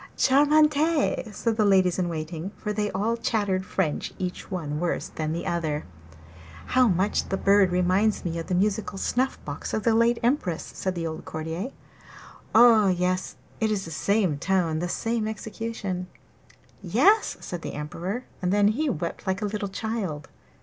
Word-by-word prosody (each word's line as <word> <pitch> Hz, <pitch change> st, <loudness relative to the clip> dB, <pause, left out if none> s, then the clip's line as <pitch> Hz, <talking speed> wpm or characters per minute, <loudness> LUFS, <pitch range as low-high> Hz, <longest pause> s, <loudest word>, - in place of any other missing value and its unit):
charmant!' 295 Hz, +3 st, +5 dB, 0.6 s
said 225 Hz, +2 st, -1 dB
the 215 Hz, -, +3 dB
ladies 190 Hz, -3 st, +3 dB
in 175 Hz, -1 st, 0 dB
waiting, 160 Hz, +2 st, -4 dB
for 210 Hz, -, -3 dB
they 210 Hz, 0 st, -1 dB
all 210 Hz, +5 st, 0 dB
chattered 205 Hz, -5 st, 0 dB
French, 185 Hz, -4 st, -2 dB
each 180 Hz, -1 st, -5 dB
one 155 Hz, -6 st, -3 dB
worse 175 Hz, 0 st, -2 dB
than 155 Hz, -1 st, -3 dB
the 170 Hz, +2 st, -3 dB
other. 155 Hz, -3 st, -1 dB, 0.8 s
'How 255 Hz, -1 st, +4 dB
much 190 Hz, +1 st, +1 dB
the 195 Hz, -, 0 dB
bird 195 Hz, -2 st, +4 dB
reminds 185 Hz, +4 st, +2 dB
me 170 Hz, -1 st, -2 dB
of 165 Hz, -, -6 dB
the 180 Hz, -, 0 dB
musical 205 Hz, +1 st, 0 dB
snuff 255 Hz, +6 st, 0 dB
box 145 Hz, -1 st, -4 dB
of 215 Hz, -, -2 dB
the 230 Hz, -, +3 dB
late 230 Hz, +1 st, +3 dB
Empress!' 235 Hz, -, 0 dB
said 185 Hz, -2 st, -3 dB
an 165 Hz, -, -2 dB
old 160 Hz, 0 st, -5 dB
courtier. 160 Hz, +8 st, -4 dB, 0.9 s
'Ah, 225 Hz, -3 st, +7 dB
yes, 185 Hz, 0 st, 0 dB, 0.2 s
it 220 Hz, -, +1 dB
is 205 Hz, -3 st, -1 dB
the 165 Hz, -, -8 dB
same 185 Hz, -3 st, +1 dB
tone, 175 Hz, -3 st, +1 dB
the 175 Hz, +1 st, -2 dB
same 225 Hz, +3 st, -1 dB
execution!' 220 Hz, -4 st, -4 dB, 0.7 s
'Yes,' 270 Hz, -, +3 dB
said 175 Hz, -2 st, -6 dB
the -, -, -5 dB
Emperor; 175 Hz, -, -4 dB, 0.2 s
and 180 Hz, -1 st, 0 dB
then 205 Hz, 0 st, +4 dB
he 290 Hz, +8 st, 0 dB
wept 170 Hz, -, -4 dB
like 190 Hz, +3 st, -1 dB
a -, -, +1 dB
little 205 Hz, -1 st, -3 dB
child. 195 Hz, -8 st, -4 dB
190 Hz, 170 wpm, -26 LUFS, 175-220 Hz, 0.9 s, Ah